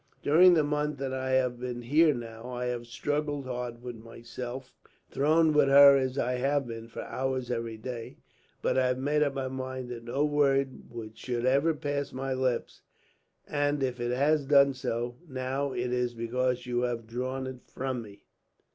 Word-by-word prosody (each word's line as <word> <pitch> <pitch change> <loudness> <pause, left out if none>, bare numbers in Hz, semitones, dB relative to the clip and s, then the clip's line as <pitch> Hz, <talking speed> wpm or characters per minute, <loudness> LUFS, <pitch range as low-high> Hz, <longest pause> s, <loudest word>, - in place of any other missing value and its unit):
During 175 +4 +7
the 155 - +4
month 150 0 -1
that 135 -1 -3
I 130 0 -2
have 125 -2 +1
been 120 -1 -5
here, 155 +6 +5
now, 115 -2 -7
I 125 0 -3
have 120 -1 -3
struggled 145 +3 -2
hard 125 -1 -5
with 120 -2 -6
myself; 120 +3 -8 0.4
thrown 155 +3 +3
with 150 -2 +5
her, 140 0 +9
as 130 0 0
I 125 -1 0
have 140 +1 +1
been, 115 -1 -7
for 115 - -7
hours 130 -1 -2
every 115 -2 -3
day. 115 0 -7 0.5
But - - +2
I 130 - +3
have 125 0 0
made 145 +3 +1
up 140 -2 +1
my 135 -1 -2
mind 130 -1 -5
that 120 -1 -7
no 135 +5 0
word 140 -2 +1 0.3
should 120 +1 -3
ever 140 +5 +3
pass 145 -1 -3
my 135 +1 -2
lips; 130 -2 -1 0.7
and 145 -1 0
if 125 -2 -2
it 120 0 -1
has 140 +3 +2
done 140 -1 +6
so, 120 -1 -3
now, 135 +2 -2
it 125 -1 -2
is 125 -1 -1
because 125 +2 -1
you 120 0 -1
have 120 -2 -2
drawn 130 +3 -3
it 130 -1 -6
from 130 -2 -3
me." 100 -3 -13
130 Hz, 180 wpm, -29 LUFS, 120-140 Hz, 0.7 s, her